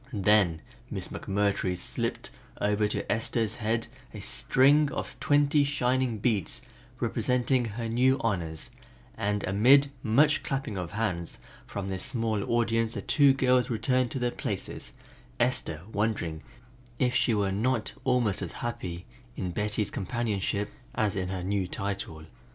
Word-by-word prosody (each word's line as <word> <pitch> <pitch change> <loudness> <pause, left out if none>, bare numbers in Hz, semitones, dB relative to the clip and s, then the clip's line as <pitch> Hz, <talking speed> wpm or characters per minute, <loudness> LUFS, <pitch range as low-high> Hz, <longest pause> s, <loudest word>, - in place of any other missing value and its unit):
Then 100 -6 +3 0.3
Miss - - -5
McMurtry 100 -2 0
slipped - - -3 0.3
over 105 0 +1 0.2
Esther's 115 0 0
head 115 +1 0 0.3
a - - -6
string 135 - +3
of - - -5
twenty 145 0 +4
shining 130 -4 +1
beads 105 -4 -1 0.4
representing 125 0 +1
her 115 +1 -4
new 125 +4 +3
honors, 85 -8 -2 0.4
and 105 0 -1
amid 135 +8 +5
much 145 +7 +4
clapping 135 -6 -3
of 90 -1 -4
hands 95 -6 -2 0.3
from 100 -1 -4
their 95 -1 -3
small 110 -1 -1
audience 115 -1 +1
the - - -4
two 140 -2 +5
girls 125 -1 +3
returned 125 +2 +1
to - - -4
their 125 -1 0
places, - - -4 0.5
Esther 80 0 0
wondering 100 -7 -1 0.6
if 125 0 +2
she 120 -2 +3
were 100 -2 +1
not 115 +3 0
almost 125 -6 +1
as - - -4
happy 90 -7 -5 0.3
in 90 - -3
Betty's 105 +2 0
companionship 105 -2 -1 0.2
as 105 -4 +1
in 90 -2 -2
her 95 -1 -3
new 95 0 0
title. 95 -5 -4
110 Hz, 135 wpm, -28 LUFS, 100-125 Hz, 0.6 s, amid